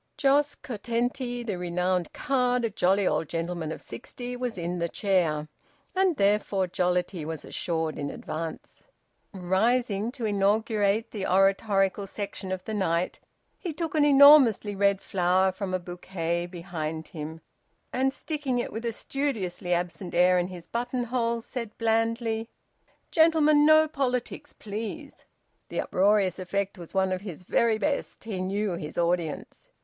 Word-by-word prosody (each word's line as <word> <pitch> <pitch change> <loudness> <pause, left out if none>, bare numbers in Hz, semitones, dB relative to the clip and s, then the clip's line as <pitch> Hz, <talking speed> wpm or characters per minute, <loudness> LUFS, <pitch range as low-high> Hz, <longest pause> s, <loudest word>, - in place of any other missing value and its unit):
Jos 285 +1 +3
Curtenty, 245 +1 -3
the 205 -6 -3
renowned 180 0 -1
card, 250 -3 +1
a 225 - -2
jolly 195 +1 +2
old 150 -1 0
gentleman 165 -1 -3
of - - -7
sixty, 245 - -7
was 245 -3 -3
in 175 +1 -3
the 170 0 -1
chair, 165 -7 +1 0.5
and 375 -4 +2
therefore 200 -1 +2
jollity 180 -1 -1
was 160 0 -5
assured 160 -2 -2
in 145 -1 -2
advance. 160 0 -6 0.5
Rising 205 +4 +1
to 250 -5 -4
inaugurate 210 +1 +1
the 200 -3 -3
oratorical 195 +1 +2
section 200 -1 -5
of 185 -1 -4
the 220 - -4
night, 180 -4 0 0.4
he 345 -4 -4
took 325 +1 -3
an 305 -2 +3
enormous 280 -6 +7
red 200 -1 +1
flower 185 +1 +2
from 190 0 -5
a 185 - +1
bouquet 175 -1 -3
behind 165 -3 -5
him, 160 +1 -7 0.5
and 265 +1 +2
sticking 285 -3 -3
it 240 - -2
with 225 +2 -5
a 235 - 0
studiously 215 -11 -3
absent 175 +1 -2
air 180 +1 +5
in 175 - 0
his 180 -2 -9
button 245 +1 -2
hole, 235 -1 -1
said 230 -2 -6
blandly, 225 0 0 0.6
"Gentlemen, 305 -2 +5
no 310 0 +7
politics, 275 0 -2
please!" 225 +8 -7 0.4
The - - -3
uproarious 195 -1 +2
effect 195 +1 -2
was 170 +2 -10
one 190 0 +2
of 185 0 -2
his 185 -4 -8
very 225 +4 +2
best. 285 +5 -2
He 205 -5 -4
knew 200 +2 -1
his 155 -3 -6
audience. 170 -2 -2
200 Hz, 145 wpm, -27 LUFS, 180-240 Hz, 0.6 s, enormous